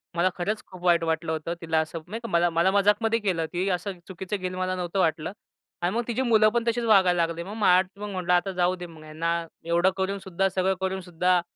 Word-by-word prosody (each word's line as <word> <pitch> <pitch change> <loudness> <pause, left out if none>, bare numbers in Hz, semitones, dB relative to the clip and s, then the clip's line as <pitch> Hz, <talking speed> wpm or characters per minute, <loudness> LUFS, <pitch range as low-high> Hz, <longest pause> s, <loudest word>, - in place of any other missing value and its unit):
मला 180 +2 +3
खरंच 205 +5 -2
खूप 185 -2 -13
वाईट 170 -2 +4
वाटलं 160 0 -1
होतं, 160 +2 -3
तिला 160 -1 +1
असं 160 +1 -5
नाही 225 - -5
का. - - -4
मला 170 0 +3
मला, 170 +3 +2
मजाकमध्ये 210 +3 +3
केलं 180 -6 0
ती 185 +3 -1
असं 180 0 -3
चुकीचं 190 +2 -4
घेईल, 185 -1 -4
मला 185 0 -1
नव्हतं 180 +1 -3
वाटलं 160 0 +1 0.5
आणि 180 +5 0
मग 240 - +2
तिची 240 +2 -1
मुलं 220 -4 +5
पण 235 +1 0
तशीच 235 +1 +1
वागायला 185 -5 +4
लागली. 165 +1 -5
मग 200 +4 -8
मला 185 -4 +5 0.2
पण 210 - -4
म्हंटल, 180 -2 -2
आता 180 +2 +3
जाऊ 180 0 +1
दे 180 -1 -7
मग, 160 -2 -13
ह्यांना 165 +2 -2 0.2
एवढं 170 +2 +3
करूनसुद्धा, 190 -1 -1
सगळं 190 0 +1
करूनसुद्धा 180 -1 +1
185 Hz, 220 wpm, -26 LUFS, 170-195 Hz, 0.5 s, मुलं